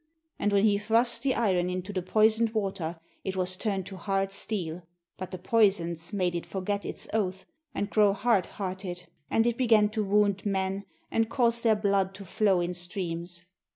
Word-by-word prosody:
And 205 - +1
when 200 0 +3
he 205 -2 +3
thrust 230 +3 +1
the 270 -2 +1
iron 185 -6 +1
into 185 +2 -4
the 185 - -1
poisoned 220 +4 +3
water 190 -5 -2 0.2
it 190 - -3
was 185 0 0
turned 195 -1 -2
to 190 - -8
hard 195 +1 -1
steel, 180 -5 -4 0.3
but 185 -1 -6
the 185 - -6
poisons 180 -4 +1
made 185 -4 0
it 170 - -2
forget 200 +1 -3
its - - -3
oath 190 -3 -1 0.3
and 205 - -1
grow 210 -1 +4
hard 205 -2 +2
hearted, 185 -2 -5 0.2
and 225 - +3
it 235 0 0
began 220 -4 +5
to 215 0 -1
wound 200 -1 +2
men 195 0 -1 0.3
and 225 0 +1
cause 235 -2 +2
their 225 -2 +4
blood 200 -2 +1
to 200 - -9
flow 190 0 +2
in 175 +1 -1
streams. 175 -1 -4
195 Hz, 185 wpm, -28 LUFS, 185-215 Hz, 0.3 s, began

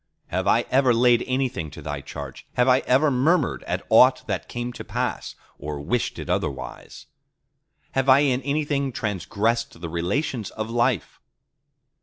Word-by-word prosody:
Have - - -1
I - - +4
ever 130 -2 +4
laid 120 0 +4
anything 130 - -1
to - - -11
Thy 75 -1 -4
charge? 70 -1 -9
Have 125 0 +2
I 130 0 +5
ever 140 +4 +4
murmured 145 +5 +2
at - - -2
aught 130 +3 +6
that 95 -4 -3
came 120 0 -4
to - - -8
pass, - - -3 0.2
or 75 0 -5
wished 100 +12 -1
it - - -6
otherwise? 65 - -4 0.9
Have 135 0 0
I 130 +2 +7
in 135 -3 +2
anything 140 0 -1
transgressed 110 0 -2
the 85 -1 -6
relations 100 - -2
of 110 +1 -5
life? 120 - 0
120 Hz, 155 wpm, -24 LUFS, 95-130 Hz, 0.9 s, I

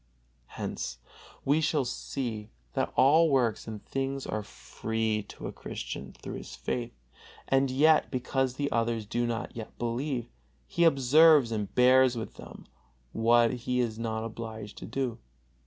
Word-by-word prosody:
Here - - -3 0.7
we 145 +3 +3
see 125 -6 -2 0.2
that - - -1
all 160 +5 +6
works 120 -7 +1
and 110 -2 -7
things 135 0 -3
are 110 - -2
free 110 +1 -3
to - - -9
a - - -3
Christian 70 -2 -6
through - - -7
his - - -9
faith; 120 -1 -3 0.5
and 135 0 +3
yet, 155 +4 +4
because 130 0 -1
the 140 +1 -2
others 115 -1 0
do 120 +3 -1
not 115 -1 -4
yet 110 -2 -8
believe, 120 +1 -2 0.4
he 170 - +1
observes 145 -2 +6
and 105 -3 -3
bears 130 0 +6
with 110 - -5
them - - -11 0.5
what 115 - +4
he 125 +1 -2
is 115 -2 -1
not 110 -1 -2
obligated 110 -2 -7
to - - -7
do. 125 -1 -2
120 Hz, 145 wpm, -29 LUFS, 115-135 Hz, 0.7 s, all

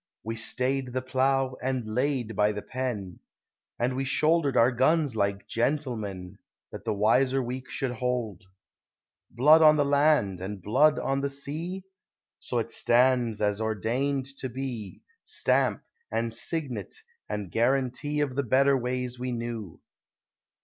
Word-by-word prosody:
We 115 +1 -4
stayed 130 +3 -1
the 130 - -1
plough, 130 0 +1
and 130 -2 -1
laid 120 0 -1
by 105 +1 +2
the 105 - -6
pen, 115 -9 -4 0.6
And 125 +2 0
we 135 - -1
shouldered 150 +1 +2
our 120 +3 +5
guns 135 +2 +2
like 100 -1 -1
gentlemen, 110 -8 -2 0.3
That - - -9
the - - 0
wiser 125 +6 +3
weak 130 +1 -5
should 135 -4 -2
hold. 120 -5 -3 0.8
Blood 150 +7 +6
on 155 -1 +7
the 145 - +3
land, 140 - +2
and 100 +1 -5
blood 135 - +3
on 135 0 -1
the 140 - -1
sea? 155 +7 -5 0.6
So 125 - -3
it 115 0 -2
stands 120 -2 +3
as 105 0 +1
ordained 120 +6 -1
to 130 - -4
be, 120 -5 -6 0.2
Stamp, - - +1 0.3
and 115 -1 -1
signet, 140 +1 -3 0.3
and 100 -4 -4
guarantee 130 - 0
Of 135 -3 -1
the 140 - +1
better 135 +2 +3
ways 125 0 -3
we 125 0 -3
knew. 115 -6 -5
125 Hz, 140 wpm, -27 LUFS, 110-135 Hz, 0.8 s, on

